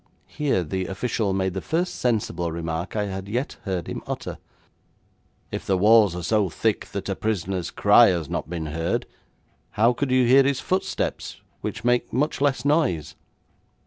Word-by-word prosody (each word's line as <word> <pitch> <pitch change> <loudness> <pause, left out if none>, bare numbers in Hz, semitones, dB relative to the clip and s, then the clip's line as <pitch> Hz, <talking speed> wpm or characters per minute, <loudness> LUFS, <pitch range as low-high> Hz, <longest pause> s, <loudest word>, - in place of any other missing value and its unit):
Here 140 -11 0
the 95 +3 -3
official 105 0 -1
made 95 -1 0
the 95 - -3
first 175 +3 -1
sensible 100 -8 -1
remark 85 +3 -4
I 105 -1 0
had 95 -1 -5
yet 125 +6 -2
heard 95 -4 -2
him - - -5
utter: - - -5 1.1
'If - - -5
the 95 - +2
walls 105 -1 +5
are 90 - -5
so 105 +1 +2
thick - - -1
that - - -5
a - - -1
prisoner's 95 -4 -2
cry 105 +3 +6
has 85 -5 0
not - - -4
been 85 -2 -4
heard, 80 +2 -2 0.7
how 115 +3 +5
could 140 +2 -2
you 130 -1 +4
hear 130 +3 +7
his 135 -1 +1
footsteps, 185 +1 -2 0.2
which 110 - -5
make 120 0 +1
much 145 +4 0
less 140 -2 +1
noise?' 140 - +1
105 Hz, 170 wpm, -24 LUFS, 90-125 Hz, 1.1 s, hear